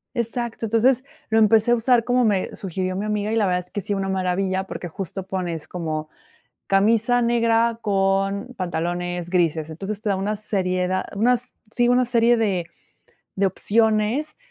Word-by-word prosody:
Exacto. 235 -1 -2
Entonces, 235 +4 +3 0.3
lo 225 - +3
empecé 220 +1 +4
a - - +6
usar 235 0 +3
como 245 0 +2
me 200 -4 0
sugirió 185 0 -3
mi 205 +2 -2
amiga, 210 0 -1
y - - 0
la 210 -3 +3
verdad 180 0 +1
es 180 - -13
que, 205 - -3
sí, 205 +2 -2
una 195 0 -2
maravilla, 190 0 0
porque, 175 - -6
justo, 190 +2 -6
pones 175 -4 -4
como: 155 -3 -4 0.6
"Camisa 225 +5 +3
negra 230 -1 +2
con 195 +1 0
pantalones 175 0 -3
grises". 160 -3 +1
Entonces, 195 +6 -5
te 210 - -1
da 195 - +1
una 205 +3 -2
seried 185 -3 -1
da 185 0 -1
unas 240 +4 +1 0.2
sí, 240 +1 +2
una 250 +1 +4
serie 235 0 +3
de 225 -2 +1
de 180 -3 -2 0.7
de 195 0 +2
opciones 220 - +1
200 Hz, 175 wpm, -23 LUFS, 185-230 Hz, 0.7 s, a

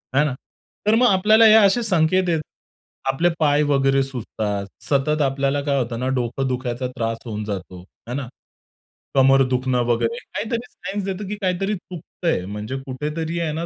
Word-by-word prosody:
आहे 145 - +5
ना. 145 - -1 0.5
तर 215 - +5
मग 245 +2 +5
आपल्याला 215 +3 +5
हे 215 - +8
असे 220 +2 +5
संकेत 185 -2 +2
आहेत. 165 -2 +1 0.7
आपले 165 +6 +2
पाय 145 -2 +3
वगैरे 135 -1 +3
सुजतात. 110 -6 -4 0.2
सतत 150 +2 +1
आपल्याला 140 0 +1
काय 140 -1 +1
होतं 120 -2 -3
ना 130 - -1
डोकं 125 +2 -1
दुखायचा 125 -1 -2
त्रास 115 -2 -2
होऊन 105 -2 -4
जातो, 95 -3 -6 0.3
आहे 120 - -4
ना? 140 -3 -4 0.9
कमर 135 0 +6
दुखणं 125 -1 +1
वगैरे 120 - 0
काहीतरी 230 -1 -4
सायन्स 200 +1 -5
देतो 195 +1 -4
की 210 - -2
काहीतरी 195 +2 0
चुकतंय. 175 - -4
म्हणजे 105 +6 -5
कुठेतरी 150 +5 -3
आहे 165 -2 -1
ना 165 +2 -3
140 Hz, 165 wpm, -22 LUFS, 125-185 Hz, 0.9 s, हे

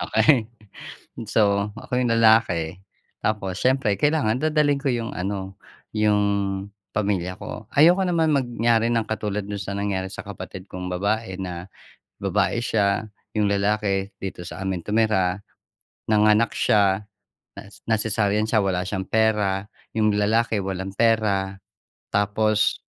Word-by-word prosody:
Okey. 110 +1 +3 0.8
So, 100 -1 +2
ako 125 +3 -2
yung 120 - +1
lalaki, 110 -7 +3 0.4
tapos 100 -3 -2
siyempre 130 -5 +2
kailangan 145 -6 +2
dadalhin 150 -2 +2
ko 140 - 0
'yong 115 -2 -3
ano 95 +1 -4 0.4
'yong 100 -2 +1 0.3
pamilya 95 -3 -1
ko. 105 0 -8
Ayoko 170 +6 +6
naman 165 -3 +2
mangyari 120 -3 +1
ng 115 -2 +1
katulad 105 -2 -2
do'n 100 -1 -5
sa 100 +1 -5
nangyari 100 -2 -2
sa - - -8
kapatid 95 -1 -8
kong 90 0 -5
babae 100 +1 -1
na, 90 -1 -6 0.5
babae 100 +3 +1
siya 105 -1 0 0.3
'yong 105 -1 +2
lalaki 100 -1 0
dito 95 -2 -5
sa 95 - -8
amin 95 -2 -2
tumira. 105 -3 +1 0.7
Nanganak 105 +1 +4
siya 100 -1 +2 0.5
nas 100 0 -10
na 110 -1 +3
cesarean 105 0 +1
siya. 110 -2 +2
Wala 90 -2 0
siyang 95 -1 -3
pera. 105 -3 +1 0.3
'Yong 110 -1 +3
lalaki 110 +1 +2
walang 95 0 -4
pera. 100 -4 +1 0.6
Tapos 105 +1 +1
105 Hz, 130 wpm, -23 LUFS, 95-110 Hz, 0.8 s, Ayoko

